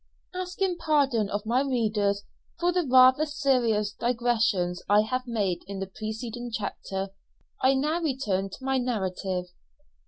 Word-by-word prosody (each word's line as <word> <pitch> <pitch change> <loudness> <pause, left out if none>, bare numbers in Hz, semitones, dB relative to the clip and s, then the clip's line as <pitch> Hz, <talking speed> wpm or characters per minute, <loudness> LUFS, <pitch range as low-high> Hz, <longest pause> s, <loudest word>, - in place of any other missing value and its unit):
Asking 365 0 -2
pardon 280 -10 +2
of 205 +1 -3
my 240 +4 +2
readers 210 -6 0 0.4
for 350 +1 +2
the 355 -4 0
rather 260 +4 +7
serious 240 -8 +1
digressions 225 -7 0
I 205 +1 +6
have 255 +4 -2
made 205 -7 -1
in 200 0 -5
the 195 - -2
preceding 225 +2 -5
chapter, 195 -2 -4 0.5
I 265 +1 +4
now 305 +6 0
return 220 - -1
to 225 - -11
my 265 -1 +2
narrative. 190 -6 -2
235 Hz, 135 wpm, -27 LUFS, 205-270 Hz, 0.5 s, rather